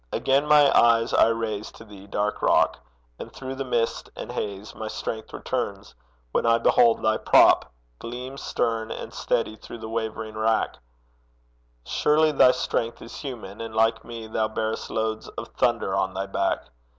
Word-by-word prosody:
Again 135 +2 +1
my 150 -2 +6
eyes 115 0 +4
I - - +6
raise 110 -2 -2
To - - -13
thee, 100 -2 -13
dark 105 +1 -2
rock; - - +3 0.4
and - - -8
through 130 0 -7
the 135 +1 -4
mist 120 -3 -1
and - - -7
haze 100 0 -5
My 110 - -6
strength 110 0 -5
returns 100 -6 -4 0.4
when - - +1
I 115 0 +4
behold 115 0 +4
thy 110 0 +3
prop - - +5 0.3
Gleam 125 +3 -7
stern 115 -1 -1
and - - -6
steady 110 - -1
through 120 - -10
the 110 -1 -8
wavering 110 -1 -4
wrack 110 +1 0 1.1
Surely 155 - +3
thy 135 -3 +6
strength 120 -2 -1
is 115 - -10
human, 115 -7 -7
and 115 -1 -6
like 115 0 +2
me 115 -1 -8
Thou 110 0 -1
bearest 110 0 -3
loads 110 0 -2
of - - -8
thunder 95 - 0
on 95 -1 -1
thy 95 +1 -2
back! 100 0 -1
115 Hz, 165 wpm, -25 LUFS, 110-120 Hz, 1.1 s, my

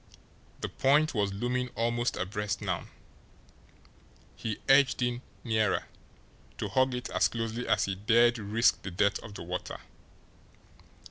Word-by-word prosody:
The - - -1
point 150 +3 +3
was 100 -4 0
looming 125 +5 -1
almost 120 +1 0
abreast 100 +1 -2
now. 95 -4 -3 1.5
He 110 -2 -4
edged 135 -2 +5
in 120 0 -1 0.2
nearer, 110 -3 +1 0.7
to - - -3
hug 130 -1 +2
it 125 - -5
as - - +3
closely 115 +1 -4
as 105 -2 +3
he 100 - -2
dared 115 +4 +3
risk 110 +3 +2
the 95 - -5
depth 100 +3 +1
of 105 -2 -11
the - - -7
water. 90 +1 -5
115 Hz, 135 wpm, -29 LUFS, 100-125 Hz, 1.5 s, edged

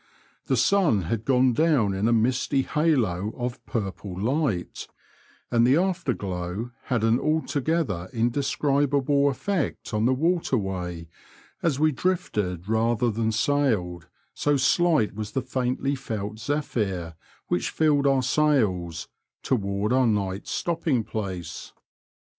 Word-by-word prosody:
The - - +2
sun 165 - +3
had 110 +6 -3
gone 130 -1 +3
down 140 -8 +2
in 95 +3 0
a - - +3
misty 125 +4 +2
halo 115 - +1
of 125 0 -4
purple 100 -4 -4
light, 115 - -1 0.6
and 115 -1 +4
the 130 +5 +5
afterglow 115 - -2
had 120 -4 0
an 115 +2 +3
altogether 155 - -1
indescribable 140 +3 +1
effect 140 - -2
on 105 +1 +1
the 130 - +3
water 165 -1 +1
way, 90 -4 -4 0.5
as 150 -5 0
we 155 0 +4
drifted 105 - -2
rather 115 +1 +1
than 110 +1 0
sailed— 110 - 0 0.3
so 145 -1 +1
slight 150 -1 +2
was 105 0 -6
the 135 - -1
faintly 130 +1 -1
felt 110 -5 -5
zephyr 105 - -2 0.3
which 90 - 0
filled 145 -3 +2
our 135 -2 +3
sails 100 - +1 0.2
— - - -57
toward 100 -2 0
our 130 -1 +4
night's 100 -3 -1
stopping 160 -8 0
place. 95 -7 -6
120 Hz, 125 wpm, -25 LUFS, 100-145 Hz, 0.6 s, the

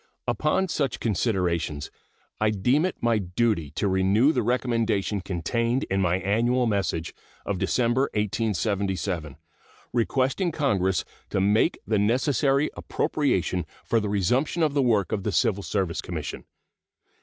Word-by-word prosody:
Upon 150 - +1
such 140 -7 -1
considerations 90 -9 -1 0.5
I 110 - +3
deem 125 - +2
it 185 - -2
my 115 -2 +2
duty 95 -3 0
to 100 - 0
renew 95 +8 +3
the 125 - +1
recommendation 115 -4 0
contained 115 +8 -1
in 95 0 +2
my 90 -1 +2
annual 120 +6 +1
message 100 -6 -1 0.3
of 100 -3 -2
December, 125 +5 +1
1877, 100 - -1 0.6
requesting 130 - +1
Congress 100 - +1 0.2
to - - 0
make 105 - +3
the 110 -2 +1
necessary 135 +6 +2
appropriation 95 - 0 0.2
for 115 - +2
the 105 -1 -2
resumption 125 - +1
of 150 -2 +2
the 140 - +2
work 110 -8 +2
of 100 - -1
the 105 - -2
Civil 100 +2 +1
Service 95 -4 -2
Commission. - - -6
110 Hz, 130 wpm, -25 LUFS, 95-125 Hz, 0.6 s, I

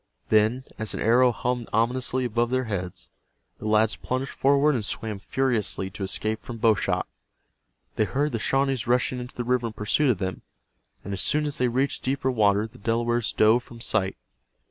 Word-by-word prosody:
Then, 110 +4 +3 0.2
as 110 -1 -2
an - - -4
arrow 125 +3 +4
hummed 120 +1 -2
ominously 125 +3 0
above 120 0 0
their 130 +1 +1
heads, 95 -6 -5 0.5
the 110 - -5
lads 110 +1 +3
plunged 130 +1 -3
forward 140 +2 +3
and 120 -5 -1
swam 105 0 -3
furiously 110 -6 -1
to 100 - -10
escape 110 +3 -2
from 120 - -7
bow 115 0 +4
shot. 105 - -1 0.9
They 110 - +3
heard 145 +6 0
the 115 - -2
Shawnees 135 0 0
rushing 125 +1 +1
into 125 0 -8
the 120 - -3
river 125 -1 +1
in 110 - -7
pursuit 115 +7 +1
of 120 - +2
them, 95 -1 -4 0.6
and 100 - -5
as 95 - -1
soon 150 0 +1
as 145 -1 -3
they 125 - +3
reached 130 +4 0
deeper 130 0 0
water 105 -3 +3
the 115 +3 -13
Delawares 120 +2 0
dove 110 +3 +4
from 120 -1 -13
sight. 105 - 0
120 Hz, 190 wpm, -25 LUFS, 110-130 Hz, 0.9 s, arrow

